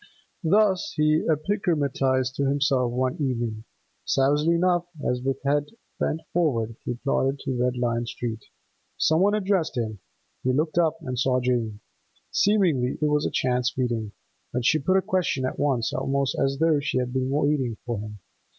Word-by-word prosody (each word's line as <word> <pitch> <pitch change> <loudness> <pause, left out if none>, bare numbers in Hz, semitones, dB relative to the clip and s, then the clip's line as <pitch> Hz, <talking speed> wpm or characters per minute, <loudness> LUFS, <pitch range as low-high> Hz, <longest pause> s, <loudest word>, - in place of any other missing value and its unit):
Thus 195 +2 +2
he 155 +1 +2
epigrammatised 145 -7 0
to 140 0 0
himself 135 -3 +1
one 130 +4 -1
evening, 115 -5 -2 0.4
savagely 145 +5 +2
enough, 175 0 +2 0.2
as 125 0 0
with 135 +1 -1
head 145 +1 +2 0.3
bent 160 - -1
forward 115 -10 +1
he 120 - -3
plodded 135 +2 0
to 135 -2 -2
Red 125 0 0
Lion 120 -1 -1
Street. 115 -2 -5 0.5
Some 160 +2 +3
one 205 +2 +4
addressed 190 -8 0
him; 110 -3 -2 0.4
he 130 - +1
looked 155 +5 +1
up 165 -1 +2
and 125 -1 -3
saw 130 -1 +2
Jane. 120 -4 -1 0.5
Seemingly 175 -12 +2
it 150 -1 +1
was 150 0 +1
a - - -4
chance 125 0 0
meeting, 120 -5 -1 0.4
but 125 -1 -2
she 155 +3 +4
put 185 +7 +2
a 190 - +1
question 180 -8 0
at 130 - -4
once 135 -6 +1
almost 135 +1 0
as 135 0 0
though 160 -1 +3
she 145 - -1
had 125 -1 -1
been 130 0 0
waiting 140 -5 0
for 120 -3 -2
him. 105 0 -7
135 Hz, 170 wpm, -25 LUFS, 125-155 Hz, 0.5 s, one